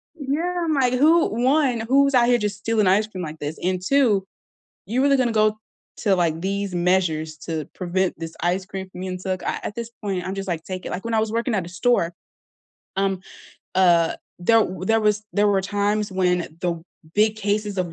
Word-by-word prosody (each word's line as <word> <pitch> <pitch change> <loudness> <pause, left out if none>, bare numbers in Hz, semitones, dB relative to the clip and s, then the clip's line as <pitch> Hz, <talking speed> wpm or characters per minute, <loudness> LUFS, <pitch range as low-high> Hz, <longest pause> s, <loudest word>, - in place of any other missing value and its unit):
Yeah, 315 +4 -2
I'm 315 - +1
like, 255 -3 +2
"Who 315 +6 +5
1, 260 -3 +2
who's 275 +4 +3
out 240 -1 +5
here 245 -1 +4
just 210 -2 -3
stealing 215 -2 +1
ice 205 +3 +3
cream 185 -4 -6
like 155 0 -7
this, 150 +2 -4
and 185 0 0
2, 235 -9 +3 0.6
you 240 +6 0
really 275 0 +4
gonna 250 -2 +2
go 215 -1 +2 0.4
to 200 -3 +2
like 165 -3 +1
these 200 +1 -2
measures 175 -3 +1
to 155 -1 -4
prevent 185 -1 -1
this 165 0 -6
ice 180 +2 0
cream 190 -1 -7
from 185 - -9
being 185 -1 -4
took," 185 0 -3
a - - -3
at 205 - -4
this 235 -1 -5
point, 195 -3 -2
I'm 190 +1 -3
just 195 0 -5
like, 165 -2 -2
"Take 185 -1 -6
it," - - -4
like, 185 - -4
when 230 - -2
I 220 - +3
was 220 0 -1
working 230 0 0
at 185 -4 -1
a - - -9
store, 185 -3 +1 0.8
um, 195 -1 0 0.5
uh, 170 -3 +4 0.2
there 225 +5 +4 0.2
there 225 +4 +2
was 210 0 +2
there 205 0 +3
were 195 -1 +3
times 205 +1 0
when 180 -1 +2 0.2
the 170 -2 -1 0.3
big 215 +1 +3
cases 205 -1 -1
of 180 -3 -2
200 Hz, 210 wpm, -23 LUFS, 180-225 Hz, 0.8 s, Who